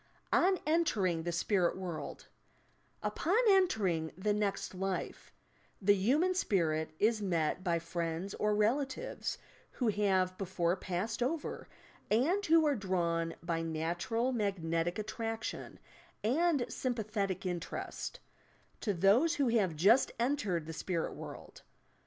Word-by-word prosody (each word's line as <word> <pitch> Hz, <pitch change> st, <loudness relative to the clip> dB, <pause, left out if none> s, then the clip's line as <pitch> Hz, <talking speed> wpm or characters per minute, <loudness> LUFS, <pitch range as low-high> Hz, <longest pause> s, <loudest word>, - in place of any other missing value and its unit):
ON 375 Hz, +1 st, +4 dB
BNTBKINQ 205 Hz, -, +1 dB
THE -, -, -1 dB
SPnUT 175 Hz, +1 st, +1 dB
WOULD 180 Hz, -4 st, -6 dB, 0.8 s
Upon 360 Hz, +7 st, +1 dB
entering 200 Hz, -, +2 dB
the 205 Hz, +2 st, +1 dB
next 205 Hz, -2 st, -1 dB
life, 190 Hz, 0 st, -4 dB, 0.5 s
the 205 Hz, 0 st, +5 dB
human 275 Hz, -, +2 dB
spirit 165 Hz, -, +1 dB
is 215 Hz, +2 st, +2 dB
met 175 Hz, -2 st, 0 dB
by 170 Hz, -3 st, +1 dB
friends 170 Hz, +2 st, -3 dB
or 210 Hz, 0 st, +1 dB
relatives 265 Hz, -, -1 dB, 0.4 s
who 245 Hz, -4 st, 0 dB
have 190 Hz, -3 st, +2 dB
before 180 Hz, -2 st, 0 dB
passed 195 Hz, +5 st, -3 dB
over 290 Hz, +5 st, -2 dB, 0.4 s
and 315 Hz, -, +2 dB
who 325 Hz, 0 st, +5 dB
are 295 Hz, -, +3 dB
drawn, 170 Hz, -5 st, -1 dB
by 165 Hz, -1 st, -1 dB
natural 170 Hz, +10 st, -1 dB
magnetic 175 Hz, -7 st, -1 dB
attraction 225 Hz, +1 st, -4 dB, 0.5 s
and 290 Hz, +3 st, +2 dB
sympathetic 215 Hz, -6 st, -2 dB
interest 180 Hz, -, -4 dB, 0.6 s
to 205 Hz, -4 st, -1 dB
those 220 Hz, -, +4 dB
who 280 Hz, -5 st, +2 dB
have 200 Hz, -8 st, +2 dB
just 205 Hz, -, +4 dB
entered 230 Hz, -, 0 dB
the 160 Hz, -, -6 dB
"Spirit 165 Hz, +1 st, -2 dB
World." -, -, -10 dB
200 Hz, 120 wpm, -33 LUFS, 175-245 Hz, 0.8 s, the